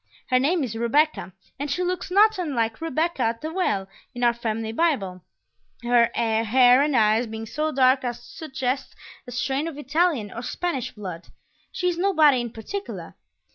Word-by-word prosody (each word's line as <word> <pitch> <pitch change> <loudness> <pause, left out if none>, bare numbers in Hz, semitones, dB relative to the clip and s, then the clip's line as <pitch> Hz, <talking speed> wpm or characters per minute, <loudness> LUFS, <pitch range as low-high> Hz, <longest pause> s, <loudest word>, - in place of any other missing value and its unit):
Her 255 - +5
name 310 +5 +1
is 230 -4 -4
Rebecca, 255 0 +1 0.3
and 285 +1 -3
she 360 +6 -1
looks 360 +1 -2
not 420 +2 +4
unlike 235 -9 -1
Rebekah 325 -1 -1
at 230 0 0
the 315 +1 -5
Well 205 - 0 0.3
in 245 - -3
our 240 -1 +4
family 225 -1 -3
Bible; 225 - 0 0.6
her 240 -1 +4
hair 235 +3 +4
and 295 -1 +1
eyes 220 +2 +3
being 220 0 -6
so 305 +7 -2
dark 260 -1 +3
as 240 -1 -3
to 240 - -17
suggest 265 -3 -4 0.3
a - - -7
strain 265 +5 -1
of 320 -4 -6
Italian 295 - 0
or 235 - -6
Spanish 270 +1 -3
blood. 185 -5 -8 0.4
She 360 - -2
is 350 -1 -1
nobody 310 -9 +4
in 240 - -4
particular. 390 - -7
255 Hz, 175 wpm, -24 LUFS, 230-315 Hz, 0.6 s, Her